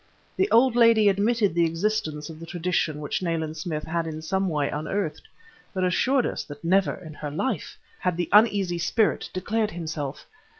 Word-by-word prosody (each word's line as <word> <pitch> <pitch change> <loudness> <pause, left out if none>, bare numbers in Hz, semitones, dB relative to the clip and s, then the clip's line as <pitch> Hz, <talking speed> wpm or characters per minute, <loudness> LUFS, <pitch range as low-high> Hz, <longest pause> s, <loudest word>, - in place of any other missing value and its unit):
The 385 +2 +1
old 240 +1 +5
lady 230 -3 +6
admitted 205 0 +2
the 170 0 +3
existence 165 -4 -2
of 160 -1 -10
the 165 - -9
tradition 165 -4 -1
which 145 - -2
Nayland 160 -3 -2
Smith 155 -1 -4
had 165 0 -2
in 155 0 -6
some 190 +3 0
way 150 -3 0
unearthed, 160 +4 -3 0.5
but 185 - 0
assured 250 +8 +2
us - - -3
that 145 +1 -11
never, 185 +3 +2
in 160 -4 -10
her 150 0 -6
time, 215 - -1 0.4
had 180 -2 -1
the 175 -2 -1
uneasy 200 -5 +4
spirit 215 +6 +1
declared 215 +4 -1
himself. 155 -6 -5
175 Hz, 175 wpm, -25 LUFS, 160-205 Hz, 0.5 s, lady